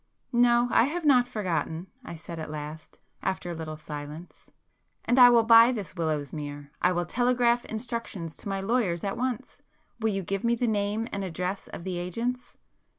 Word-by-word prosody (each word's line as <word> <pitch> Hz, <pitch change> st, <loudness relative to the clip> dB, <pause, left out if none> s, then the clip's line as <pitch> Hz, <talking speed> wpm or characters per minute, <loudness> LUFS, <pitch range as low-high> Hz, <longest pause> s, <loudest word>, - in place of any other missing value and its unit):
"No, 240 Hz, 0 st, +4 dB
I -, -, +5 dB
have 325 Hz, +4 st, -3 dB
not 250 Hz, -4 st, +5 dB
forgotten"—I 185 Hz, -, -4 dB
said 165 Hz, +1 st, -8 dB
at 155 Hz, -, -5 dB
last, 155 Hz, +1 st, -7 dB, 0.2 s
after 190 Hz, -2 st, -2 dB
a -, -, -3 dB
little 160 Hz, -1 st, -6 dB
silence. 150 Hz, +2 st, -9 dB, 0.6 s
"And 245 Hz, -, +3 dB
I 245 Hz, -1 st, +10 dB
will 235 Hz, -1 st, +5 dB
buy 230 Hz, +1 st, +8 dB
this 205 Hz, -9 st, -5 dB
Willowsmere. 145 Hz, -3 st, -3 dB
I 180 Hz, -, +4 dB
will 175 Hz, -1 st, 0 dB
telegraph 245 Hz, +3 st, +2 dB
instructions 220 Hz, -8 st, -4 dB
to -, -, -7 dB
my 195 Hz, 0 st, -2 dB
lawyers 195 Hz, -5 st, 0 dB
at 195 Hz, -1 st, -2 dB
once. 255 Hz, +2 st, -4 dB, 0.4 s
Will 225 Hz, 0 st, +1 dB
you 195 Hz, -2 st, -2 dB
give 195 Hz, +2 st, -3 dB
me 235 Hz, 0 st, +3 dB
the 245 Hz, -, -1 dB
name 210 Hz, 0 st, 0 dB
and 200 Hz, -, -3 dB
address 180 Hz, +2 st, -3 dB
of -, -, -8 dB
the 180 Hz, -1 st, -3 dB
agents?" 235 Hz, +8 st, -4 dB
195 Hz, 175 wpm, -27 LUFS, 165-240 Hz, 0.6 s, I